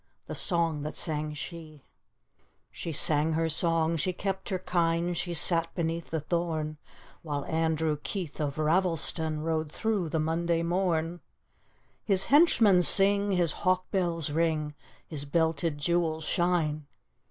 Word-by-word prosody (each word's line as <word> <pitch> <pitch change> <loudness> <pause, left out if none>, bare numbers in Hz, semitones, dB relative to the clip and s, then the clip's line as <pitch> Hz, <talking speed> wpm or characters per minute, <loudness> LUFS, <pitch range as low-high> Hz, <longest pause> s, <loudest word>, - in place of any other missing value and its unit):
The - - -7
song 165 -4 0
that 150 +1 -5
sang 150 -1 -2
shel 155 0 -8 0.9
She 165 - -6
sang 155 +1 +2
her 165 +1 0
song, 165 0 +1
she 180 +4 -1
kept 190 +1 -4
her 190 - -1
kine, 170 -1 0
She 175 0 -3
sat 165 0 +2
beneath 165 -1 -3
the 160 -1 -2
tiiom 155 -2 -2 0.4
When 145 -3 -4
Andrew 160 -2 -1
Keith 180 -8 -5
of 145 -2 -2
Ravelston 160 -2 0
Rode 160 -2 -2
throu^ 210 -5 -2
the 160 - -1
Monday 165 +2 0
mom; 175 -1 -1 0.8
His 195 -2 +4
henchmen 225 - +5
sing, 200 +2 +6
his 175 -3 +1
hawk 185 0 0
bells 170 -6 -1
ring, 155 -1 -1 0.3
His 150 -3 -6
belted 160 +1 0
jewels 160 +1 -1
shine! 155 -3 -1
165 Hz, 135 wpm, -28 LUFS, 155-175 Hz, 0.9 s, sing